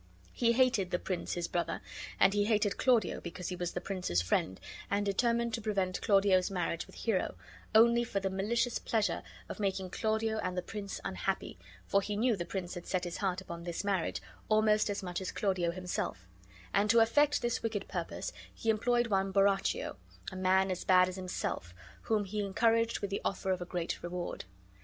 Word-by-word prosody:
He 235 -1 +3
hated 245 -7 +3
the 180 - +1
prince 180 0 -3
his 175 -1 -2
brother, 170 -1 -1 0.4
and 195 0 +6
he 205 0 +2
hated 210 -2 +2
Claudio 240 -7 +3
because 170 +1 -5
he 180 - -3
was 175 -1 -3
the - - -2
prince's 180 - -1
friend, 95 +1 0 0.3
and 205 +1 +1
determined 235 +3 +1
to 230 - -2
prevent 195 -4 -1
Claudio's 195 -3 +4
marriage 175 -3 -2
with - - -15
Hero, 215 -5 -1 0.4
only 235 +2 +6
for 205 -4 -2
the 195 -1 -2
malicious 230 +5 0
pleasure 210 -6 0 0.3
of - - -7
making 190 -2 -1
Claudio 220 0 0
and 185 -2 -2
the 180 - -1
prince 200 0 -5
unhappy, - - -2 0.3
for 200 - +3
he 205 +1 -3
knew 235 +1 +3
the 175 -3 -4
prince 180 0 -4
had 175 -1 -7
set 185 -1 0
his 175 -1 -4
heart 190 -2 -1
upon 170 -2 -7
this 170 +1 -3
marriage 195 -4 -1 0.3
almost 215 0 +4
as 200 0 -2
much 180 0 -3
as 185 - -3
Claudio 185 -4 0
himself; 175 - -3 0.5
and 205 +1 +3
to 230 - +5
effect 290 +6 +4
this 240 0 0
wicked 220 -3 -2
purpose - - -4 0.2
he 225 - +1
employed 240 +2 +2
one 195 -3 +1
Borachio, 195 0 +2 0.3
a - - -8
man 190 +1 +3
as 185 - -3
bad 185 -1 +5
as 185 - -6
himself, 180 - -4 0.3
whom 215 -2 0
he 205 +2 -2
encouraged 230 +3 +2
with 200 - -3
the 200 - -1
offer 190 -1 -1
of 185 -1 -1
a - - -3
great 175 -1 -3
reward. 175 - -4
195 Hz, 195 wpm, -32 LUFS, 180-220 Hz, 0.5 s, and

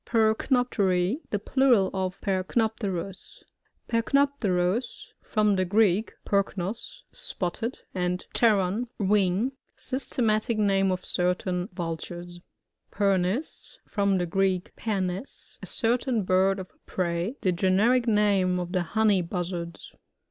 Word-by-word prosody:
Pbrcnopterl 220 - +1
— - - -33
The 205 - 0
plural 235 -3 +3
of 185 -1 -2
Perc 190 -2 -2
nopterus. 200 -5 -2 0.4
Percnoptrrus. 230 -5 0
— - - -50
From 210 -3 +3
the 185 - +2
Greek, 205 +1 +2
perknos^ 200 - -2
spotted, 230 - -3
and 180 0 -2
pteron^ 210 0 +2
wing. 200 +3 +2 0.3
Systematic 230 -4 0
name 195 -2 +2
of 185 0 -3
certain 180 +1 0
Vul 165 -2 -3
tures. 175 +1 -8 0.5
Pernis. 195 - 0
— - - -40
From 200 -2 +2
the 175 - 0
Greek, 185 +1 0
pernes^ 195 +1 -3
a - - -8
certain 235 -1 0
bird 190 +1 +3
of 185 -1 -8 0.2
Prey, 175 +5 -2
fhe 185 -2 +2
generic 215 +8 +3
name 200 -4 +3
of 175 0 -4
the 185 -1 +1
Honey 205 +2 +2
Buzzards. 170 -1 -5
195 Hz, 120 wpm, -27 LUFS, 180-220 Hz, 0.5 s, plural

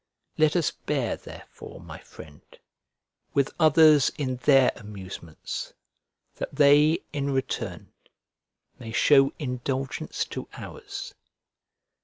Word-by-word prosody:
Let 155 +1 +3
us 170 -4 +2
bear 135 -6 -2
therefore, - - -12
my - - -10
friend, 75 -1 -14 0.9
with 140 0 +1
others 155 -2 +6
in 130 -3 -2
their 135 0 +4
amusements, 95 -6 -8 0.6
that - - -6
they, 150 +2 +5
in 140 -1 -2
return, 135 -1 -3 0.9
may 115 -2 -8
show 135 0 +5
indulgence 130 -1 -3
to - - -7
ours. - - -8
135 Hz, 100 wpm, -26 LUFS, 125-150 Hz, 0.9 s, others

